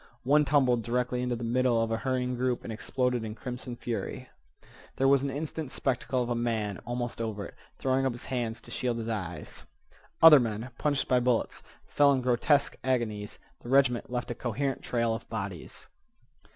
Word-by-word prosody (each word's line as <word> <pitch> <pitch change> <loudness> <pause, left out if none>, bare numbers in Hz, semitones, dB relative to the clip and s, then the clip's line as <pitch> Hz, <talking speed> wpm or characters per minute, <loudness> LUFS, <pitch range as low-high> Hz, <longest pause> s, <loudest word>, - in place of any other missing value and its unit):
One 150 +3 +4
tumbled 130 -5 +3
directly 125 +2 -1
into 125 -1 -1
the 120 - -6
middle 120 0 +2
of 115 0 0
a 115 - +1
hurrying 125 0 -1
group 125 0 -1
and 115 - -5
exploded 125 +1 -1
in 110 -1 -5
crimson 125 0 -6
fury. 120 -1 -5 0.7
There 135 - +2
was 135 -1 +5
an 140 - -1
instant 150 0 -4
spectacle 130 -1 0
of 120 - -5
a - - +3
man, 110 -4 -1
almost 120 -1 -3
over 105 -3 -3
it, - - -10 0.2
throwing 130 0 +1
up - - 0
his 120 - -7
hands 120 -4 -2
to - - -11
shield 120 -2 -1
his 115 -1 -4
eyes. 90 -8 -5 0.6
Other 160 -3 +10
men, 115 +1 -3
punched 145 -2 +1
by 125 - +4
bullets, 125 -1 0 0.2
fell 145 -1 +4
in 130 - 0
grotesque 130 +4 +2
agonies. 110 -5 -1 0.2
The 120 - -10
regiment 130 -3 +3
left 125 0 -3
a - - -1
coherent 130 +3 -2
trail 115 -2 0
of 115 - -7
bodies. 100 -6 -6
125 Hz, 185 wpm, -29 LUFS, 115-130 Hz, 0.7 s, Other